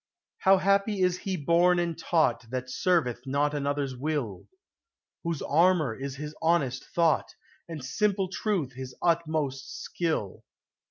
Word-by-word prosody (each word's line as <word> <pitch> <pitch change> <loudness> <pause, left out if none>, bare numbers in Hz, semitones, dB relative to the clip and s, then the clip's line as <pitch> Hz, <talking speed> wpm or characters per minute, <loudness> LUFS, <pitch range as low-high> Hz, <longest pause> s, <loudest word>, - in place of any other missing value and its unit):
How 190 0 +5
happy 200 +2 +2
is 180 -1 +2
he 190 -2 -3
born 170 +4 +3
and 170 -1 0
taught 140 -8 +1
That 130 0 -4
serveth 165 -11 +1
not 145 +2 +1
another's 140 -2 -1
will; 130 -8 -3 0.8
Whose 170 -4 -2
armor 165 -4 +3
is 135 +1 -5
his 150 +2 -6
honest 160 -6 +1
thought, 165 -2 +1 0.3
And 155 -6 -6
simple 195 +6 +1
truth 185 - -2
his 130 0 -8
utmost 155 -6 -1
skill! 160 - -2
155 Hz, 130 wpm, -28 LUFS, 135-175 Hz, 0.8 s, How